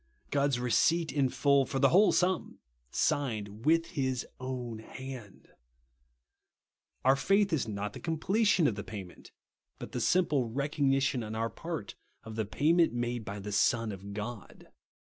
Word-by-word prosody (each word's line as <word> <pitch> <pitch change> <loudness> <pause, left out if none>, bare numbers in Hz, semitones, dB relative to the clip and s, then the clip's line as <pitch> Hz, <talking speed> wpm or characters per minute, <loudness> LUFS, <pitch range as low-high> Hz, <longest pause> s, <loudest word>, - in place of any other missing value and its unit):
God's 140 -3 +1
receipt 155 +8 +2
in 140 -3 +1
full, 135 +2 +3
for 135 - -4
the 135 0 +5
whole 200 +7 +5
sum, 180 -1 0 0.3
signed 110 - -1
with 165 +1 +4
his 130 -6 -1
own 125 -3 -5
hand. 125 -2 -10 1.6
Our 135 +1 +6
faith 195 +6 +2
is 135 -7 0
not 105 -1 -4
the - - -8
completion 185 +3 +2
of 135 - +3
the 105 0 -6
payment, 95 -5 -9 0.5
but - - -8
the - - -3
simple 175 -6 +3
THE 125 - 0
BLOOD - - -6
OF - - -10 0.2
SPRINKLING. 140 -3 +2
63 135 -1 +1
recognition - - -4
on 110 0 -6 0.2
oiir - - -28
part 165 -11 -5 0.3
of 110 - -8
tlie 110 0 -2
payirient 160 - +3
made 120 -1 -2
by 100 -1 -6
the 105 +1 -6
Son 110 +2 +2
of 100 +1 -8
God. 110 0 -7
130 Hz, 170 wpm, -30 LUFS, 110-155 Hz, 1.6 s, Our